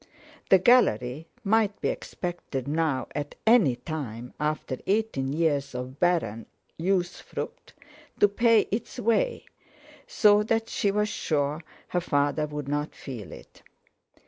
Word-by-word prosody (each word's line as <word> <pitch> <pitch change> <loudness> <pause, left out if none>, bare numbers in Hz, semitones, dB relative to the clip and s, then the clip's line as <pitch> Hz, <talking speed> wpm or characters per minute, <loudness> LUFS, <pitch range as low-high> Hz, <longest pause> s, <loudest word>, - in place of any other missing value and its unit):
The 190 - +8
Gallery 160 - +3 0.2
might 215 0 +2
be - - 0
expected 175 -7 -5
now 150 -3 0
at 145 0 -4
any 220 - +5
time, 125 -5 -6
after 150 -3 -2
eighteen 195 -11 0
years 145 -4 0
of 125 +2 -6
barren 135 - +1 0.3
usufruct, 190 - -3 0.4
to 205 - +7
pay 225 +2 +4
its 215 +5 -3
way, 245 - +1 0.6
so 210 - +5
that 225 +1 0
she 200 - 0
was 210 +1 +1
sure 150 -5 -1 0.3
her 180 - 0
father 145 -1 +1
would 150 -2 -6
not 145 +1 -2
feel 115 - -8
it. - - -13
160 Hz, 125 wpm, -27 LUFS, 140-210 Hz, 0.6 s, The